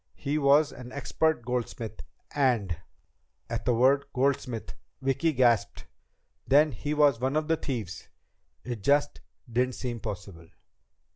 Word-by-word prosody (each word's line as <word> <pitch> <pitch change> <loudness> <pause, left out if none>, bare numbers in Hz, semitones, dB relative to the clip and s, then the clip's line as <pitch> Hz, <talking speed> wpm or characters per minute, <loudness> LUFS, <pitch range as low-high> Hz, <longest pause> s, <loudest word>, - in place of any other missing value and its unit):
He 145 +2 -1
was 145 +1 +4
an 125 0 -10
expert 140 -1 0
goldsmith, 120 -3 -4 0.3
and 120 -11 +1 0.4
..." - - -46
At 115 - -3
the 125 - +3
word 135 +4 +4
"goldsmith" 130 -3 -1 0.3
Vicki 135 +5 +1
gasped. 120 -7 +2 0.6
Then 150 +3 +5
he 150 +2 -3
was 145 -5 +4
one 130 +3 -1
of 155 0 0
the 165 - +3
thieves! 110 - -5 0.5
It 120 -4 -5
just 145 +5 +2 0.3
didn't 125 +2 0
seem 120 -2 -4
possible! 95 -6 -7
130 Hz, 135 wpm, -28 LUFS, 115-140 Hz, 0.6 s, Then